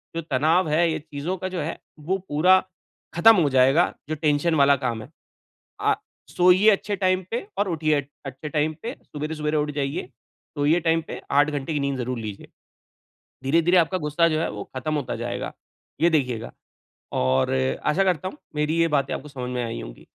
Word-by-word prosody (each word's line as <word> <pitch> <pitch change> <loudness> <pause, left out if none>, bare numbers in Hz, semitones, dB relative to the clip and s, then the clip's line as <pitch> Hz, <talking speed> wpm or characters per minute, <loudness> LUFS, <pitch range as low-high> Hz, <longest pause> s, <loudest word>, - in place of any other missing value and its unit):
जो 165 - -1
तनाव 155 +3 +2
है 165 +3 +3
ये 160 - -2
चीज़ों 150 +4 -4
का 185 - -4
जो 185 - -4
है 155 +3 -4 0.3
वो 190 - +2
पूरा 180 +6 +5 0.6
ख़त्म 225 +7 +7
हो 145 - +2
जाएगा 135 +6 +4 0.2
जो 155 - -1
टेंशन 155 +2 +1
वाला 140 -1 +5
काम 115 -2 -1
है। - - -13 0.7
अ, - - +3 0.4
सोइए 180 +4 +6
अच्छे 205 0 -1
टाइम 185 -1 +1
पे 235 -1 -2
और 205 +1 +1
उठिए 155 -3 +1
अ, - - -15 0.2
अच्छे 135 +3 -6
टाइम 150 +1 0
पे। 235 +3 -4
सवेरे-सवेरे 150 0 -3
उठ 150 0 0
जाइए, 140 +2 -2 0.5
सोइए 150 +4 +3
टाइम 165 -1 +1
पे - - -7
8 145 +2 +4
घंटे 145 +1 -3
की 150 - 0
नींद 140 -1 -1
ज़रूर 125 0 -3
लीजिए। 105 -3 -7 1.0
धीरे-धीरे 165 +6 +3
आपका 180 +2 +2
गुस्सा 150 +1 +2
जो 155 -1 0
है 165 - -1
वो 105 0 -6
ख़त्म 155 +4 -2
होता 145 -4 -2
जाएगा, - - -4 0.5
ये 170 +2 +4
देखिएगा। 125 -8 -1 0.6
और 65 +1 +1 0.3
आशा 165 +6 +3
करता 185 -2 0
हूँ 190 - -10 0.2
मेरी 150 +2 0
ये 165 - +4
बातें 140 -3 0
आपको 150 - -7
समझ 130 -3 -6
में 125 -1 -2
आई 115 0 -4
होंगी। - - -10
150 Hz, 190 wpm, -24 LUFS, 140-170 Hz, 1.0 s, ख़त्म